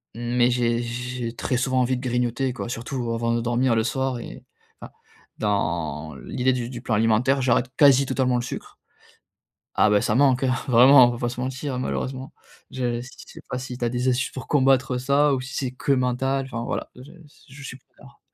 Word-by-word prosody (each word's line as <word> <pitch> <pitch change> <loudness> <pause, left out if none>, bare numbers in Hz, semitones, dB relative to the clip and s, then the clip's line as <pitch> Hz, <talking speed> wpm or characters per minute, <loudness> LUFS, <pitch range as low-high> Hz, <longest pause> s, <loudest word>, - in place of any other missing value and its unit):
mais 120 +1 +1
j'ai 120 -1 +1
j'ai 120 0 -5
très 125 - -1
souvent 130 +1 +1
envie 125 +1 +1
de - - -7
grignoter 125 +1 -1
quoi. 120 - -6
Surtout 120 0 -4
avant 115 0 0
de 115 - 0
dormir 120 +1 +1
le 110 - +2
soir 130 +1 -2
et - - -10 0.3
enfin, - - -11 0.4
dans 85 -7 -2
l'idée 130 +1 0
du 120 -2 -3
du 125 -2 -7
plan 115 -3 -1
alimentaire, 115 +5 +2
j'arrête 125 0 +2
quasi 140 -2 +5
totalement 130 -2 0
le 120 - -1
sucre. 120 - -8 1.0
Ah, 105 - +4
beh, 105 -1 +3
ça - - 0
manque 130 +1 +3
hein, 130 -1 +2
vraiment, 125 +1 +7
on - - 0
va 120 - -5
pas 120 0 -2
se 120 - -7
mentir 130 0 -4
malheureusement. 130 +1 -4 0.4
Je 120 -2 -2
je 125 - -10 0.2
sais - - -12
pas 125 - -3
si 125 0 -6
tu 125 - -5
as - - +1
des 125 +2 -2
astuces 125 0 +1
pour 130 - -8
combattre 130 -2 +2
ça, 140 +3 +2
ou 130 - -1
si 140 +3 -8
c'est 130 -2 -2
que 130 +2 -2
mental 130 +1 0
enfin 120 -3 -5
voilà, - - -4
je 130 +4 -13
s 165 -4 -19
je 135 +2 -12
suis 130 -1 -8
preneur. - - -20
125 Hz, 210 wpm, -24 LUFS, 120-130 Hz, 1.0 s, vraiment